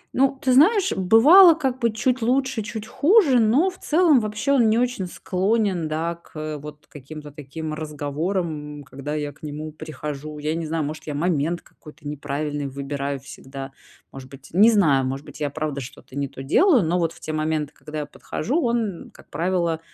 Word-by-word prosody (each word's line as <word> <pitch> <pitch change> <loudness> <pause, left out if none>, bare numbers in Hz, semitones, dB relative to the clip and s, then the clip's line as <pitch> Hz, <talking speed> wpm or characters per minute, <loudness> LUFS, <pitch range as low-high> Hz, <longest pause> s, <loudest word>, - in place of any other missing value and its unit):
Ну, 270 +1 +2
ты 260 -1 +1
знаешь, 380 - +5
бывало, 295 - +7
как 265 -5 -2
бы, 235 -2 +1
чуть 250 +3 0
лучше, 260 0 +1
чуть 215 0 -6
хуже, 295 - +4
но 255 - +3
в 370 - -17
целом 315 -3 +4
вообще 215 +5 -2
он 245 -5 +4
не 220 - +3
очень 245 -6 0
склонен, 190 -1 0
да, 160 +2 -2
к, 170 -1 -21
э, 155 0 -4
вот 150 +1 -11
каким-то 150 +1 -10
таким 155 +2 -7
разговорам, 150 0 -3
когда 140 +3 -6
я 145 -1 -3
к - - -26
нему 155 +1 -6
прихожу. 150 0 -7
Я 150 +1 -2
не 165 -1 -3
знаю, 160 0 -1
может, 155 +2 -6
я 150 - -3
момент 165 +1 0
какой-то 150 -1 -14
неправильный 145 0 -3
выбираю 140 0 -4
всегда, 135 0 -9 0.4
может 130 -1 -10
быть, 135 0 -13
не 205 +6 +7
знаю, 160 -12 +4
может 135 +2 -4
быть, - - -12
я 145 -1 -1
правда 145 -1 -3
что-то 130 0 -11
не 140 0 -1
то 135 0 -9
делаю, 270 - +4
но 170 +2 +1
вот 165 -2 0
в - - -15
те 155 - -5
моменты, 155 -1 -1
когда 155 0 -8
я - - -4
подхожу, 245 - -3
он, 230 -6 -1
как - - -19
правило, 170 -2 0
160 Hz, 190 wpm, -23 LUFS, 145-225 Hz, 0.4 s, бывало